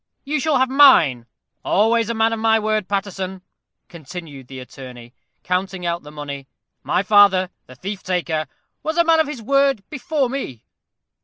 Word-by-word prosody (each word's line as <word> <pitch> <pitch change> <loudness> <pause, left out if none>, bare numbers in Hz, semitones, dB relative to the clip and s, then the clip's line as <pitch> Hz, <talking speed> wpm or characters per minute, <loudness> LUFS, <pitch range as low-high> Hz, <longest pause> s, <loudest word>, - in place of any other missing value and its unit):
You 300 +2 -2
shall 300 0 +1
have 260 +1 +3
mine 170 - +5 0.4
always 225 +2 +2
a 235 - -2
man 225 +1 +2
of 225 - -3
my 225 0 +3
word, 215 -2 -1
Paterson," 190 -1 -4 0.4
continued 160 -5 -10
the 130 - -10
attorney, 125 -2 -11 0.3
counting 180 0 -2
out 170 0 -1
the 150 - -12
money. 140 -2 -7 0.3
"My 185 - 0
father, 190 -3 +5 0.2
the 130 - -13
thief 195 +7 -6
taker, 170 -4 -2 0.3
was 315 +2 -3
a 340 - +5
man 330 -1 +4
of 315 - +2
his 275 -6 -7
word 275 -3 +1
before 300 -1 -1
me." 240 - -6
195 Hz, 165 wpm, -20 LUFS, 160-255 Hz, 0.4 s, mine